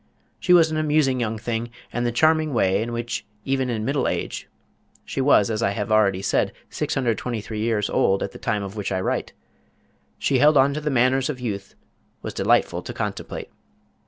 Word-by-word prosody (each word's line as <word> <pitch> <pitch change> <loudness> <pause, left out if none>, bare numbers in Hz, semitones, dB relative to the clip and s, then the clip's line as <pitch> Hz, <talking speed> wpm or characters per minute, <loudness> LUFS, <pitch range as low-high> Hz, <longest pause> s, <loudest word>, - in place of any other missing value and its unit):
She 180 - 0
was 165 -3 +6
an 155 - -1
amusing 150 -4 +2
young 115 -2 -1
thing, 115 +1 -3 0.2
and 120 - -1
the - - 0
charming 155 +2 +2
way 95 -2 +2
in 115 +1 -3
which 120 0 -3 0.2
even 135 -1 0
in 110 -2 -2
middle 140 -1 0
age - - -3 0.6
she 135 - -3
was 115 -6 +4
as 110 +1 -1
I 100 -2 +1
have 105 +1 -3
already 100 -3 +3
said - - +1 0.2
623 115 -4 -2
years 110 -2 0
old 95 0 +2
at - - -4
the - - -11
time 105 -1 -1
of 100 +1 -7
which 105 -2 -3
I 95 - 0
write 95 - -2 0.8
she 135 -2 +1
held 150 +2 +6
on 135 +1 +4
to 150 - -3
the 150 - -1
manners 130 +1 +2
of 135 -4 -4
youth 100 -5 -5 0.5
was - - -5
delightful - - +2
to - - -7
contemplate. - - -5
120 Hz, 190 wpm, -23 LUFS, 105-135 Hz, 0.8 s, was